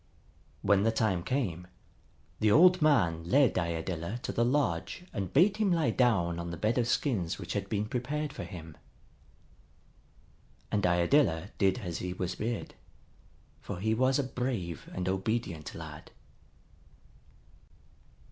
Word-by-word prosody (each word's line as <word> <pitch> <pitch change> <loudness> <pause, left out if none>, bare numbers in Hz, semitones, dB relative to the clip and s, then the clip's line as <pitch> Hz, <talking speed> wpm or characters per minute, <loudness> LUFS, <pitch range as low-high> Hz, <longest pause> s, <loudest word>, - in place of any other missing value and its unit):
When 100 -1 +4
the 115 +2 +3
time 110 -6 +1
came, 90 -6 -2 0.7
the 110 - +3
old 180 - +6
man 95 - +3
led 130 +10 +4
Iadilla 85 +4 -3
to - - -2
the 120 - +1
lodge 125 - 0
and 100 -5 -3
bade 190 +8 +4
him 210 -3 +2
lie 165 -3 +2
down 90 -9 +2
on 85 0 -4
the 85 - -5
bed 110 +8 +1
of 120 - +1
skins 100 - 0
which 85 -4 -6
had 100 -1 -3
been 105 -1 -1
prepared 140 +5 -3
for - - -6
him. 80 -4 -9 2.0
And 100 -3 +2
Iadilla 85 - +2
did 95 +3 +3
as 85 -4 -4
he 90 0 -3
was 90 0 -3
bid, 115 +1 -4 0.9
for - - -6
he 110 +3 +1
was 130 +3 +2
a 145 - +1
brave 125 - -4
and 90 0 -4
obedient 95 -4 -2
lad. - - -9
105 Hz, 140 wpm, -30 LUFS, 85-130 Hz, 2.0 s, old